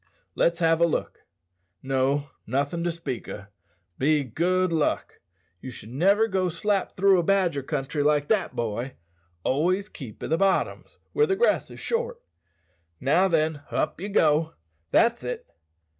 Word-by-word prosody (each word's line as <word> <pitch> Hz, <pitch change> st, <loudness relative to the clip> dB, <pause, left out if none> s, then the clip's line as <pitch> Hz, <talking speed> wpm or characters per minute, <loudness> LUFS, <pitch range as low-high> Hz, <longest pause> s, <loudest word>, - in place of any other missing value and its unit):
"Let's 170 Hz, 0 st, +2 dB
have 165 Hz, -1 st, +2 dB
a 170 Hz, -, +6 dB
look. 160 Hz, -, -3 dB, 0.6 s
No, 135 Hz, +2 st, 0 dB, 0.2 s
nothin' 140 Hz, +7 st, -1 dB
to 175 Hz, -, +1 dB
speak 165 Hz, -7 st, -5 dB
o', 100 Hz, -, -7 dB, 0.5 s
be 150 Hz, +2 st, +3 dB
good 180 Hz, +7 st, 0 dB
luck. 155 Hz, -2 st, -1 dB, 0.4 s
Ye 130 Hz, -, -7 dB
should 110 Hz, -2 st, -10 dB
niver 200 Hz, -, +3 dB
go 185 Hz, -3 st, 0 dB
slap 195 Hz, +4 st, -1 dB
through 195 Hz, -1 st, +5 dB
a -, -, +1 dB
badger 175 Hz, -6 st, +2 dB
country 145 Hz, +1 st, -2 dB
like 145 Hz, 0 st, +2 dB
that, 210 Hz, -4 st, +1 dB
boy; 120 Hz, +3 st, -3 dB, 0.5 s
always 185 Hz, +9 st, +1 dB
keep 125 Hz, -, -10 dB
i' -, -, -1 dB
the 160 Hz, -, +1 dB
bottoms, 195 Hz, -1 st, 0 dB, 0.2 s
where 445 Hz, +1 st, +3 dB
the 385 Hz, -, +2 dB
grass 475 Hz, +5 st, +2 dB
is -, -, -11 dB
short. 475 Hz, +1 st, -2 dB, 0.8 s
Now 165 Hz, +9 st, +3 dB
then, 160 Hz, -3 st, +1 dB
up -, -, -1 dB
ye 200 Hz, -, -4 dB
go. 160 Hz, -3 st, +2 dB, 0.3 s
That's 235 Hz, -, +3 dB
it!" -, -, -4 dB
165 Hz, 155 wpm, -26 LUFS, 140-195 Hz, 0.8 s, a